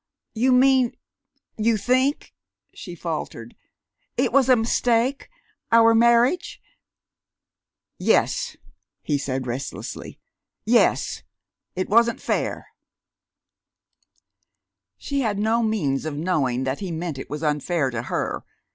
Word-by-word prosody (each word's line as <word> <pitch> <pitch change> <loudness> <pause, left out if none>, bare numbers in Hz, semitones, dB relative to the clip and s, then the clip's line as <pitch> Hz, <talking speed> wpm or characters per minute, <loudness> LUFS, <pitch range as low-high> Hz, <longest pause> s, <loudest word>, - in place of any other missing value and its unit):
"You 245 +4 +2
mean 255 -1 +4 0.6
you 225 +1 +2
think," 260 +6 0 0.4
she - - -9
faltered, - - -6 0.6
"it - - +1
was 270 -2 +4
a 255 - +7
mistake 235 - 0 0.4
our 230 0 +6
marriage?" 235 - +3 1.4
"Yes," - - +1 0.5
he 145 -2 0
said 130 -1 -3
restlessly. 125 +3 -6 0.5
"Yes.... - - +2 0.5
It 185 - -2
wasn't 235 +2 +3
fair." - - -2 2.3
She 280 -1 -3
had 215 -5 -1
no 220 +3 +1
means 165 -12 -1
of 150 -2 -4
knowing 140 -7 0
that 130 +1 -2
he 190 -3 -5
meant 160 -3 -4
it - - -8
was 150 +2 -5
unfair 150 -1 0
to 120 -1 -3
her. - - -3
215 Hz, 110 wpm, -23 LUFS, 150-235 Hz, 2.3 s, a